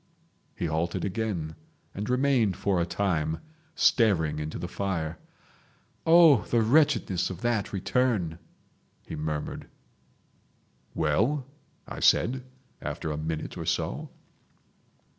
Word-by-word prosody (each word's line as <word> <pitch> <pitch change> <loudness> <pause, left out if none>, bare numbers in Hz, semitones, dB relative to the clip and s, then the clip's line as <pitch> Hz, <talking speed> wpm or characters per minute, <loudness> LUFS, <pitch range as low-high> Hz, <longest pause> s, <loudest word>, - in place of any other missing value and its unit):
He - - -3
halted 80 +2 -1
again, 95 -6 -3 0.4
and 105 +4 -4
remained 125 -7 +2
for 95 -3 +1
a 85 - -1
time, 80 -6 -1 0.4
staring 80 - +3
into 75 0 -4
the 90 - -4
fire. 85 -4 -3 0.9
"Oh! 165 -7 +7
the 115 -2 +2
wretchedness 110 - +3
of 95 -2 -7
that 120 -4 0
return!" 100 -5 0 0.7
he - - -6
murmured. 75 -1 -4 1.3
"Well?" 115 - +1 0.4
I - - -6
said 130 +2 +3 0.4
after 80 - -4
a - - -2
minute 80 0 -4
or - - -4
so. - - -1
95 Hz, 110 wpm, -27 LUFS, 80-120 Hz, 1.3 s, Oh